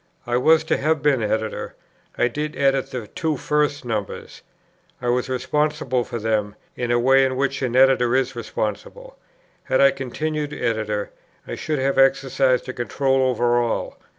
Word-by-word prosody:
I 120 - -1
was 160 +6 +4
to 160 - 0
have 155 +1 0
been 140 -4 +3
Editor. 110 0 -2 0.4
I 120 - +3
did 150 +5 -4
edit 135 -1 +1
the 125 -4 -5
two 160 - -2
first 145 -1 0
numbers. 110 -4 -5 0.6
I 125 - -2
was 125 +1 0
responsible 140 -1 0
for 120 - -5
them, 105 -2 -1 0.2
in 120 -1 -3
the 120 - +3
way 135 +2 +4
in 130 -1 0
which 140 +1 -1
an 125 -2 -1
Editor 130 -2 +4
is 130 -1 0
responsible. 120 - -5 0.5
Had 130 - +1
I 140 0 +6
continued 150 +3 -4
Editor, 110 -5 -2 0.4
I - - -5
should 155 -1 -3
have 135 0 0
exercised 135 -1 +2
a 130 - -4
control 135 +2 0
over 120 -1 +2
all. 120 -1 -2
130 Hz, 165 wpm, -22 LUFS, 120-140 Hz, 0.6 s, I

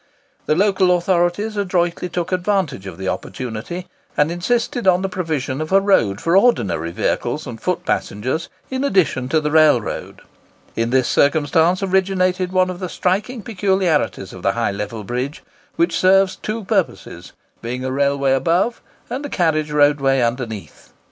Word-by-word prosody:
The 155 - +3
local 190 -1 +3
authorities 175 +4 0
adroitly 180 -3 -1
took 175 +1 -3
advantage 185 - -1
of 90 -3 -8
the 95 - -5
opportunity, 125 - -5 0.3
and 150 +2 +3
insisted 230 +5 -1
on 185 0 +4
the 195 - -1
provision 155 -7 -3
of 155 - -5
a 195 - +6
road 115 - +2
for 170 +2 +1
ordinary 115 - +2
vehicles 85 - -2
and - - -8
foot - - -2
passengers 130 - -2 0.2
in 260 +1 -1
addition 180 - +1
to 160 - +3
the 150 -1 -2
railroad. 155 -7 +2 0.5
In 115 0 0
this 130 0 +2
circumstance 160 +5 +2
originated 185 -1 +1
one 185 0 +2
of 180 - -8
the 185 -2 -4
striking 205 +8 -1
peculiarities 190 -6 0
of - - -10
the - - +1
High - - 0
Level 105 +2 -5
Bridge, 125 +7 -4 0.3
which 170 0 +1
serves 190 +1 +4
two 220 +1 -5
purposes, 185 - -2 0.3
being 125 +2 -4
a 130 - -2
railway 140 0 +1
above 170 - +1 0.3
and 255 +4 -4
a 290 - -5
carriage 155 - 0
roadway 145 -2 +3
underneath. 115 - -4
170 Hz, 155 wpm, -20 LUFS, 135-190 Hz, 0.5 s, a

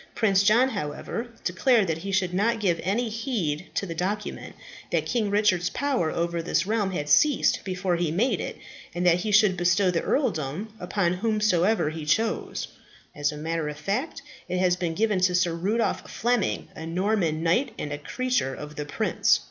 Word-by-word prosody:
Prince 200 -4 +3
John, 225 +6 +4
however, 205 - -4 0.2
declared 215 +4 +3
that 165 -2 -2
he 195 +4 -5
should 185 -2 0
not 225 +5 +1
give 175 -5 +1
any 215 +7 0
heed 210 - -2
to - - 0
the 170 - -5
document; 195 +6 -4 0.4
that - - +1
King 225 -4 0
Richard's 200 -4 +2
power 270 - 0
over 170 +1 -1
this 170 +1 0
realm 210 -1 0
had 160 -6 -3
ceased 250 - +3
before 180 -2 -1
he 170 -2 0
made 195 +3 +1
it; - - -5 0.4
and 175 +1 -1
that 175 -1 +5
he 210 +4 -2
should 205 -2 +5
bestow 180 +2 +2
the 165 - 0
earldom 195 - -1
upon 180 -1 0
whomsoever 210 -3 +1
he 160 0 -6
chose. 215 +9 0 0.5
As 145 0 0
a 150 - -8
matter 160 0 -2
of 150 - -7
fact, 235 - -3 0.3
it 180 - -1
has 180 -1 +3
been 175 -2 -3
given 210 -1 +1
to 180 0 +2
Sir 175 -1 +2
Rudolph 200 +8 -1
Fleming, 240 +2 0
a 160 - -7
Norman 175 -3 0
knight 175 +12 +2
and 145 - -4
a 145 - -5
creature 250 - -1
of 150 +2 -9
the 150 - -3
prince. 145 - +2
185 Hz, 185 wpm, -26 LUFS, 165-220 Hz, 0.5 s, that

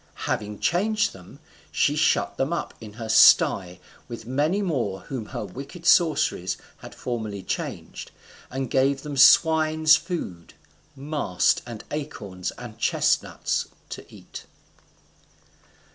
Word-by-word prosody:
Having 105 0 -3
changed 205 +4 +1
them, 90 -2 -14 0.3
she 145 - +2
shut 155 0 +1
them 135 +4 -1
up 170 - -3
in 105 -2 -10
her 115 0 -7
sty 90 -4 +5 0.3
with 115 -2 -8
many 150 - 0
more 120 - -2
whom 120 -2 -6
her - - -5
wicked 140 +6 -10
sorceries 155 - +3 0.2
had - - -12
formerly 110 -5 -5
changed, - - -5 0.4
and 130 -1 -4
gave 135 +1 +2
them 150 -1 -5
swine's 155 +3 +6
food 95 - -6 0.4
mast, 140 - 0
and 115 -3 -8
acorns, 100 -11 -5
and - - -10
chestnuts - - 0 0.2
to - - -7
eat. - - -11
135 Hz, 120 wpm, -24 LUFS, 105-155 Hz, 0.4 s, swine's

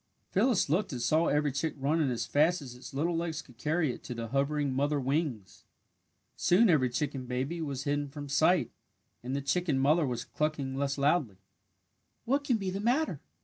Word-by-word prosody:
Phyllis 245 -7 +3
looked 180 +7 0
and 125 - -3
saw 155 +8 +2
every 150 0 +2
chick 145 +4 -2
running 145 +2 +1
as 120 -2 -2
fast 160 +5 +3
as 135 -5 -9
its 125 - -11
little 165 +5 0
legs 165 -1 -2
could 125 -3 -19
carry 150 0 +1
it - - -12
to 125 - -5
the 115 -1 -5
hovering 140 +1 0
mother 145 +2 +1
wings. 135 - -2 0.7
Soon 195 +3 +4
every 130 -6 +3
chicken 135 0 -3
baby 135 +7 -2
was 140 -4 -3
hidden 145 0 -1
from 145 +1 -7
sight 160 +5 +3 0.5
and 130 +3 -4
the 140 - -1
chicken 155 0 +1
mother 150 +3 +3
was 120 -2 -3
clucking 150 -3 -2
less 140 0 -1
loudly. 140 - +1 0.9
"What 275 +4 +1
can 255 -5 +2
be 195 -3 -3
the 195 - -3
matter?" 240 - 0
145 Hz, 190 wpm, -30 LUFS, 135-165 Hz, 0.9 s, Soon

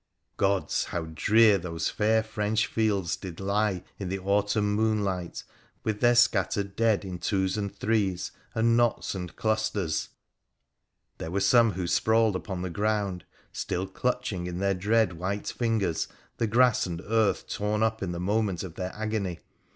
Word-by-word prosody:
Gods! 100 -1 +1
how 85 -2 -3
drear 105 +3 +5
those 85 -2 -3
fair 110 +1 +2
French 110 0 0
fields 100 -6 0
did 90 -4 -8
lie 100 -1 0 0.2
in 95 -3 -4
the 95 - -1
autumn 105 +2 +1
moonlight, 105 -5 -1 0.4
with 110 -1 -1
their 120 0 +5
scattered 100 -4 +2
dead 110 -2 +2
in 90 -2 -6
twos 95 -1 0
and 100 -2 -2
threes 100 -5 0 0.2
and 115 +1 +3
knots 120 -1 +1
and 90 -3 -6
clusters! 110 -7 -1 1.1
There 80 - -4
were 95 +4 -1
some 115 +2 +5
who 90 0 -3
sprawled 110 +3 +3
upon 95 -1 -4
the 90 - -3
ground— 100 -2 -1 0.3
still 90 +2 -2
clutch 125 +2 -2
ing 90 -1 -4
in 90 0 -4
their 100 +1 +1
dread 100 -2 +1
white 100 +3 -2
fingers 110 -8 0 0.3
the 115 - +1
grass 120 -1 +3
and 85 -2 -4
earth 110 -1 +1
torn 105 +1 -1
up 110 0 0
in 95 -3 -2
the 85 - -4
moment 100 0 0
of 90 -4 -7
their 90 +1 -5
agony. 105 -5 -2
100 Hz, 160 wpm, -27 LUFS, 95-110 Hz, 1.1 s, drear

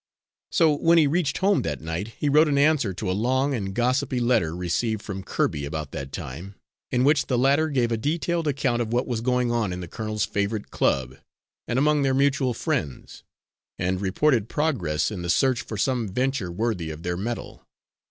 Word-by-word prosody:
So, 160 -4 +4
when 165 +3 +4
he 160 - +6
reached 150 0 0
home 195 +1 +2
that 75 -4 -3
night, 80 +5 -4
he 150 - -1
wrote 150 +3 +5
an 145 -2 +1
answer 140 -7 +3
to 90 0 -3
a - - +1
long 130 +7 +1
and 100 -6 -3
gossipy 125 +4 0
letter 115 -10 +1
received 100 +5 -1
from 95 -2 -5
Kirby 75 -5 -1
about 75 -1 -4
that 70 0 -6
time, 85 +12 -7 0.4
in 125 0 +2
which 145 +2 +3
the 125 - +1
latter 140 +5 +3
gave 125 -5 +1
a 115 - +1
detailed 165 +6 -1
account 130 -4 0
of 115 -1 -3
what 120 +1 +1
was 120 -3 -2
going 125 0 +1
on 115 -5 0
in 90 - -4
the 90 - -6
colonel's 110 +3 -2
favourite 100 +1 -2
club 65 0 0 0.5
and 120 - -1
among 150 +2 +3
their 135 -1 +2
mutual 135 -2 +2
friends, 130 - -3 0.6
and 95 +1 -1
reported 115 +3 +1
progress 110 - 0
in 95 -4 -5
the 85 - -4
search 130 +8 +2
for 110 - -7
some 120 +1 0
venture 125 -3 -1
worthy 95 -4 -2
of 80 +1 -8
their 90 0 -1
mettle. 115 +6 -5
120 Hz, 195 wpm, -25 LUFS, 95-140 Hz, 0.6 s, he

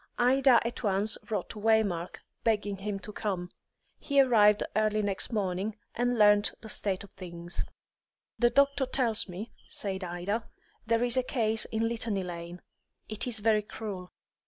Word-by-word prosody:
Ida 255 0 +5
at 235 - -4
once 205 0 +2
wrote 215 - -2
to 215 - -8
Waymark, 205 -6 +1 0.2
begging 205 -3 0
him 200 +1 -3
to 210 - -8
come; 185 -5 -3 0.5
he 280 -1 +1
arrived 210 -6 +5
early 215 0 +2
next 200 +2 -1
morning, 200 -1 -1 0.2
and 245 0 0
learnt 205 -1 +5
the 220 - -10
state 195 -3 -2
of 200 - -14
things. 175 -1 -6 0.8
"The 240 - +5
doctor 280 0 +3
tells 240 -6 0
me," 190 +6 -7 0.2
said 190 -2 -2
Ida, 180 +6 -3 0.4
"there 230 +1 +2
is 245 +1 +2
a - - +5
case 225 -4 +1
in 225 0 -1
Litany 225 -4 -1
Lane. 175 0 -7 0.5
It 215 +3 -3
is 225 -4 -1
very 215 0 +3
cruel. 200 -4 -7
215 Hz, 160 wpm, -29 LUFS, 195-230 Hz, 0.8 s, Ida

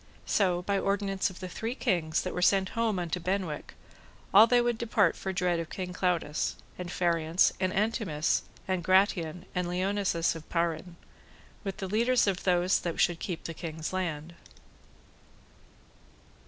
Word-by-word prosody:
So 180 -3 +1
by 200 +1 0
ordinance 195 -1 0
of 185 - -12
the 185 - -4
three 225 +6 -4
kings 165 - 0
that 185 - -4
were 180 - -3
sent 190 +1 +3
home 230 -3 0
unto 175 0 -2
Benwick, 180 -4 -3 0.6
all 210 +4 +9
they 245 +1 +4
would 240 -1 0
depart 235 -1 +2
for 190 - -4
dread 180 -2 0
of 165 -1 -5
King 180 -1 -5
Claudas; 175 -5 0 0.2
and 180 -1 -6
Phariance, 170 -1 +2
and 185 -1 +1
Antemes, 195 -7 0 0.3
and 185 -2 -1
Gratian, 185 -2 +2
and 180 -1 -1
Lionses 185 -1 0
[of] 160 -2 -10
Payarne, 170 0 -1 0.7
with 195 -2 -4
the 190 - -4
leaders 235 +5 +3
of 195 -3 -1
those 180 0 +3
that 170 -2 -4
should 175 -1 +2
keep 175 -3 -4
the 165 - -5
kings' 160 +1 -5
lands. 170 -3 -3
180 Hz, 155 wpm, -29 LUFS, 170-195 Hz, 0.7 s, all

